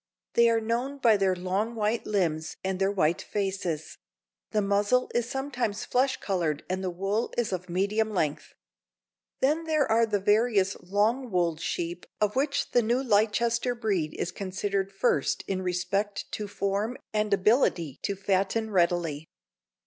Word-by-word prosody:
They 235 0 +5
are 230 0 +3
known 240 +5 -2
by 235 -5 +5
their 195 -2 +2
long 190 +6 -2
white 220 +1 -1
limbs 165 -6 -1
and 190 -1 -2
their 195 +1 +2
white 175 -4 +1
faces; 190 -6 -3 0.5
the 215 - +1
muzzle 205 +5 +2
is 240 0 0
sometimes 255 -6 -2
flesh 260 +1 +1
colored 170 -7 -1
and 185 +1 -2
the 185 - -1
wool 195 +6 -1
is 235 -5 0
of 180 0 -4
medium 200 +5 +1
length. 160 -8 -2 0.9
Then 305 +5 +2
there 310 -3 +2
are 230 +1 +4
the 210 -2 0
various 205 -1 +2
long 215 +7 +1
wooled 170 -4 0
sheep 175 +1 -3
of 210 +1 +1
which 280 +2 0
the 245 - +4
new 240 +4 +1
Leicester 235 +2 +2
breed 200 -9 -1
is 175 - -2
considered 195 0 -2
first 195 - +1
in 190 -1 -2
respect 195 +3 -1
to 210 - -4
form 200 +4 -2 0.2
and 210 0 0
ability 185 - +2
to 200 - -2
fatten 195 +3 0
readily. 170 -5 +1
205 Hz, 155 wpm, -28 LUFS, 185-230 Hz, 0.9 s, They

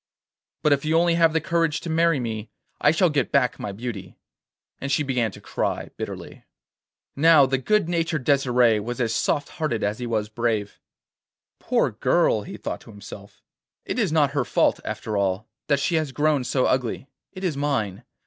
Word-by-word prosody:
But 150 - +5
if 140 - 0
you 155 +1 +2
only 170 0 +3
have 165 -1 +4
the 160 - +1
courage 165 -1 0
to - - -7
marry 165 -2 +3
me 110 -2 -4 0.3
I - - +4
shall 165 +2 +3
get 140 -3 0
back 140 -3 +2
my 100 - -4
beauty.' 110 -1 -7 0.6
And 140 - -4
she 150 +1 +2
began 125 -5 0
to - - -11
cry - - -3
bitterly. - - -7 0.7
Now 155 -1 +6
the 135 0 0
good 210 +6 +1
natured 165 -4 -1
Desire 125 -5 +3
was 120 +4 -5
as 115 -2 0
soft 145 +4 0
hearted 155 -11 -2
as 105 +3 -1
he 125 - -4
was 110 -2 -1
brave. 110 -2 -2 0.8
'Poor - - +1
girl,' - - +2
he - - -8
thought - - -5
to - - -16
himself. 100 -1 -12 0.4
'It - - -3
is 205 -8 +1
not 150 -3 +3
her 140 -2 0
fault, 120 - +2
after 110 -2 -4
all, 100 +1 -1 0.2
that 140 -2 +2
she 140 - 0
has 155 -3 -1
grown 145 0 +1
so 130 +1 +1
ugly, 130 +1 -1 0.3
it 185 0 -9
is 175 -6 0
mine. 135 -10 -1
135 Hz, 185 wpm, -24 LUFS, 115-155 Hz, 0.8 s, Now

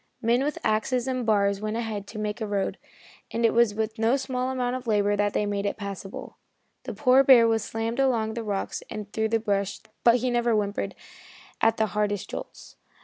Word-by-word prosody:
Men 240 +2 +2
with 295 +1 -2
axes 235 +4 0
and 255 -3 -2
bars 200 -2 +2
went 215 +1 -2
ahead 215 -4 -4
to 215 - -9
make 210 +1 -3
a 220 - -2
road, 200 -2 -2 0.5
and 230 0 0
it 225 - +3
was 235 -3 +3
with 220 0 -3
no 230 +4 +3
small 255 -1 -2
amount 250 -1 -1
of 255 -1 -6
labor 205 -1 +2
that 205 0 0
they 210 - +1
made 205 0 -1
it - - -3
passable. 200 -2 -7 0.5
The - - -5
poor 255 -2 +4
old 270 - +5
bear 240 -4 +8
was 225 -1 +1
slammed 225 +3 -3
along 240 -5 +2
over - - -5
the 230 0 -4
rocks 200 -2 -3
and 210 -1 -7
through 220 0 0
the 225 0 +2
brush, 200 -2 -1 0.2
but 235 0 +6
he 250 +1 0
never 240 -1 +2
whimpered 200 -1 -2 0.7
at 225 0 +3
the 220 - +2
hardest 205 -2 -1
jolts. - - -8
220 Hz, 215 wpm, -26 LUFS, 205-240 Hz, 0.7 s, bear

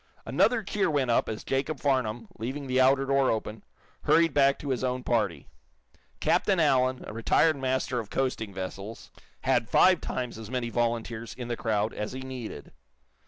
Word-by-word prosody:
Another 230 -2 +2
cheer 195 -1 0
went 140 -5 +1
up - - +2
as 110 - -5
Jacob 135 +2 -1
Farnum, 120 -5 0
leaving 135 +5 -4
the 130 0 +2
outer 135 +1 +4
door 135 -1 +2
open, 110 0 -3 0.4
hurried 165 -2 +4
back 140 -1 +4
to 145 - -6
his 130 -1 -1
own 125 0 -1
party. 105 - 0 0.7
Captain 195 -3 +2
Allen, 130 -4 +2
a - - -7
retired 135 +8 +3
master 130 -2 -1
of 110 -3 -6
coasting 130 -6 -2
vessels, 95 +3 -7 0.3
had 125 -3 +1
five 185 -2 +5
times 125 -3 -4
as 110 -1 -8
many 125 -2 -2
volunteers 115 -1 -2
in 120 -2 -6
the 120 - -1
crowd 110 -1 -1
as 105 +3 -4
he 130 - -6
needed. 125 - -7
125 Hz, 170 wpm, -28 LUFS, 115-135 Hz, 0.7 s, five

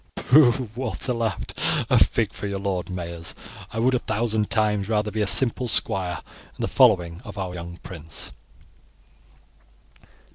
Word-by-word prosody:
"Pooh!" 130 -3 +4
Walter 125 0 -3
laughed; 115 -3 -3 0.3
"a - - +6
fig - - -1
for 105 - -5
your 100 -1 -3
lord 95 -2 -3
Mayors! 85 -2 -5 0.4
I - - -7
would 125 +3 +2
a 125 - +2
thousand 110 -1 -1
times 105 -2 0
rather 105 -1 0
be 110 - -2
a 105 - +1
simple 125 +4 +4
squire 90 -6 +2 0.3
in - - -9
the - - 0
following 90 -9 +3
of 105 -4 -10
our 95 -2 -4
young 85 0 -8
prince." 80 -5 -5
105 Hz, 150 wpm, -24 LUFS, 90-115 Hz, 0.4 s, a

